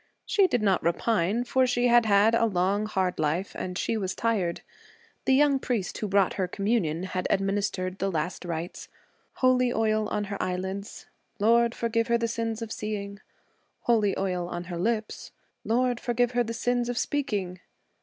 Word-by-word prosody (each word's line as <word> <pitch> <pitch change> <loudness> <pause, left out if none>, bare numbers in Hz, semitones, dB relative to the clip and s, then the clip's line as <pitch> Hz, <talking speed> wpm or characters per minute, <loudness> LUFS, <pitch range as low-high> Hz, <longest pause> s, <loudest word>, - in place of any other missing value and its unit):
She 395 -2 +3
did 245 -10 0
not 195 -3 +3
repine, 205 +5 +1
for 260 +1 +2
she 245 0 +1
had 240 -2 +5
had 205 +2 +5
a 230 0 +3
long, 200 +2 0
hard 190 -3 -1
life 160 +6 -1
and 180 -1 -5
she 225 - -1
was 190 -3 -3
tired. 200 -7 -1 0.6
The 265 - +4
young 285 -1 +4
priest 230 -8 -2
who 215 - -2
brought 195 -1 +2
her 185 - +1
communion 190 -4 -1
had 185 -1 -2
administered 195 -1 -1
the 195 - 0
last 170 +3 -3
rites 170 0 -5 0.5
holy 255 -1 +3
oils 215 -2 +1
on 210 - -1
her 200 -1 -4
eyelids 190 +3 -4 0.3
(Lord, 235 +2 +3
forgive 230 0 0
her 235 - +3
the 230 0 -1
sins 230 0 -3
of 225 - -7
seeing!); 200 -2 -4 0.6
holy 215 -5 +2
oils 180 -2 -2
on 175 0 -4
her 175 0 -6
lips 215 +2 -2 0.3
(Lord, 245 +1 +1
forgive 245 0 0
her 245 -1 +2
the 230 - -5
sins 245 +1 0
of 245 - -3
speaking!) 205 -13 -2
210 Hz, 175 wpm, -27 LUFS, 185-235 Hz, 0.6 s, had